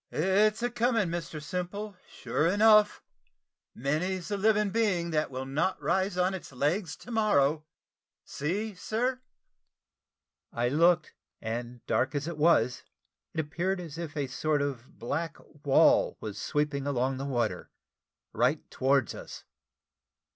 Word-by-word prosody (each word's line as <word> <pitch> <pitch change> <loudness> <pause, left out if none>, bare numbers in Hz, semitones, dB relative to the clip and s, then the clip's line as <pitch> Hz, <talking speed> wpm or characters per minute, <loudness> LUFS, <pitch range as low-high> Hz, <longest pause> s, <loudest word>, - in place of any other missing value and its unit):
"It's 210 +6 +2
a 245 - 0
coming, 230 -5 +1
Mr 165 -2 -4
Simple, 180 +6 -5
sure 155 - -1
enough; 210 +2 +5 0.7
many's 170 - -1
the 205 - -1
living 210 0 +2
being 185 -7 +1
that 155 -1 0
will 130 0 -5
not 150 +8 -1
rise 190 +1 0
on 180 +1 +2
its 185 -6 -7
legs 150 +7 -1
to 245 - -12
morrow. 155 -9 +2 0.6
See, 200 +9 -3
sir." 240 +8 -2 1.3
I 120 +1 0
looked, 165 +3 +3 0.3
and 120 +2 -5
dark 130 +3 0
as 145 +2 -2
it 170 -3 -5
was, 145 -7 +3 0.5
it - - -1
appeared 175 +5 -2
as 165 -2 -7
if 160 -3 -6
a 145 - 0
sort 145 +2 0
of 130 -4 -6
black 150 +6 -3 0.3
wall 140 -3 +4
was 105 -2 -6
sweeping 145 -2 -1
along 130 -1 0
the 135 - -4
water 120 -5 -2 0.6
right - - +1
towards 135 -3 +2
us. - - -9
165 Hz, 135 wpm, -29 LUFS, 140-195 Hz, 1.3 s, enough